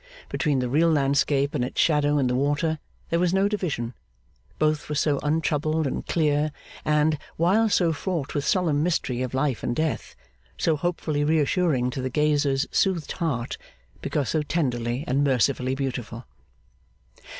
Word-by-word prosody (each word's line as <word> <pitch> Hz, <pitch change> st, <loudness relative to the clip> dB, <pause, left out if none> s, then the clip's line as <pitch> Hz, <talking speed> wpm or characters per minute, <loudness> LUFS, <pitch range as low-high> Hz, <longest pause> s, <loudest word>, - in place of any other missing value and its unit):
Between 150 Hz, -3 st, 0 dB
the 125 Hz, -1 st, 0 dB
real 155 Hz, +7 st, +3 dB
landscape 140 Hz, -1 st, +2 dB
and 135 Hz, -5 st, 0 dB
its 125 Hz, -, -4 dB
shadow 150 Hz, -2 st, +3 dB
in 140 Hz, -, +2 dB
the 125 Hz, -, +1 dB
water, 145 Hz, +4 st, 0 dB, 0.3 s
there 170 Hz, -, +2 dB
was 180 Hz, +1 st, +2 dB
no 195 Hz, +1 st, +3 dB
division; 160 Hz, -, -2 dB, 0.6 s
both 155 Hz, -1 st, 0 dB
were 150 Hz, -, -2 dB
so 145 Hz, -1 st, +1 dB
untroubled 155 Hz, 0 st, 0 dB
and 135 Hz, -, -2 dB
clear, 150 Hz, -2 st, +1 dB, 0.3 s
and, 150 Hz, 0 st, +2 dB, 0.2 s
while 200 Hz, +7 st, +3 dB
so 175 Hz, -5 st, +2 dB
fraught 160 Hz, -3 st, -3 dB
with 145 Hz, -, -1 dB
solemn 165 Hz, -6 st, +1 dB
mystery 150 Hz, -7 st, 0 dB
of 130 Hz, 0 st, -3 dB
life 135 Hz, -3 st, 0 dB
and 120 Hz, -, -2 dB
death, 160 Hz, +1 st, -2 dB, 0.4 s
so 160 Hz, -, +2 dB
hopefully 155 Hz, -2 st, -1 dB
reassuring 150 Hz, -3 st, +2 dB
to 130 Hz, -, -4 dB
the 130 Hz, -, -2 dB
gazer's 145 Hz, -1 st, +1 dB
soothed 185 Hz, -5 st, +1 dB
heart, 140 Hz, -9 st, -2 dB, 0.4 s
because 145 Hz, -4 st, -1 dB
so 155 Hz, -, +1 dB
tenderly 125 Hz, -5 st, -1 dB
and 135 Hz, +3 st, +1 dB
mercifully 130 Hz, -1 st, +1 dB
beautiful. 125 Hz, -3 st, -4 dB
150 Hz, 155 wpm, -25 LUFS, 135-160 Hz, 0.6 s, real